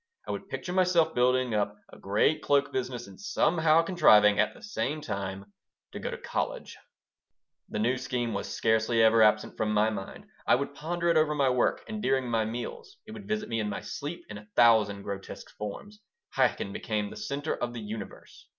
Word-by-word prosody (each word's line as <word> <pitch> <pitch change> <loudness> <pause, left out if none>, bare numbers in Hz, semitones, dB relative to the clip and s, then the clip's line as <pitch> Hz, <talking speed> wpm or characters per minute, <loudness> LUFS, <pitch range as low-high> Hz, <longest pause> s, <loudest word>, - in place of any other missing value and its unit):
I - - -2
would - - -6
picture 180 - -5
myself 180 -3 +3
building 125 0 +2
up 105 0 -1 0.2
a - - -12
great 105 +10 +1
cloak 145 0 +2
business 125 -2 -3
and 100 - -14
somehow 165 -5 +3
contriving, 105 - +5
at - - +2
the - - -16
same 155 -8 -2
time, 100 -5 -5 0.4
to - - -7
go - - -4
to - - -5
college - - -4 0.9
The - - -4
new 125 +4 +1
scheme 125 -3 -2
was - - -4
scarcely 110 +1 +2
ever 110 0 +5
absent 105 0 +3
from 105 -1 0
my 105 +1 +3
mind. 100 -3 -7 0.2
I - - +6
would 140 +2 -3
ponder 170 +4 -2
it 170 - +4
over 155 -1 +2
my 135 -3 +3
work 125 -1 +1
and 215 -1 -5
during 130 -9 +1
my 115 -2 +1
meals. 400 - -6
It 215 - -11
would 210 -2 -9
visit 215 0 -2
me 115 -1 -2
in 105 -1 -1
my - - -4
sleep 150 +4 -6
in 105 -1 -8
a 105 - -16
thousand 110 -4 +4
grotesque 100 -1 -7
forms. 200 - -7 0.4
Chaikin 100 - +1
became 105 -1 -2
the - - -9
center 145 +3 -3
of 120 0 -4
the 120 - -6
universe. 105 -2 -9
120 Hz, 195 wpm, -28 LUFS, 105-155 Hz, 0.9 s, I